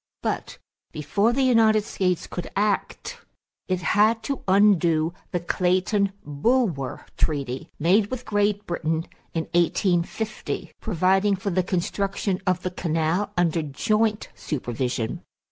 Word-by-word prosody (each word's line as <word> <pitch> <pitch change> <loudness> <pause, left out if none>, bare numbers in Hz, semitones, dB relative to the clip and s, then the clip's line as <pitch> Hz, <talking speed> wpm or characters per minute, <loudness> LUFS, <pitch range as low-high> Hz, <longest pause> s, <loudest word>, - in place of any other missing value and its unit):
But - - -3 0.3
before 200 +9 +1
the 265 +3 +1
United 225 -4 +4
States 180 -5 -1
could 175 - -6
act 210 - -1 0.5
it 185 -1 -1
had 220 +4 +3
to 275 +2 -3
undo 175 -5 +4 0.2
the 175 - -1
Clayton 185 +3 +1
Bulwer 150 - 0
treaty, 140 +1 -2
made 190 +7 +3
with 255 +2 -6
Great 205 0 +1
Britain 165 -1 -1 0.3
in 165 - 0
1850, 175 +4 0
providing 195 0 +2
for 195 +1 -3
the 185 +1 +2
construction 190 +1 -1
of 185 -1 +1
the 185 - -2
canal 170 +3 0
under 170 -1 +2
joint 215 - 0
supervision. 125 -4 -3
185 Hz, 120 wpm, -24 LUFS, 165-210 Hz, 0.5 s, United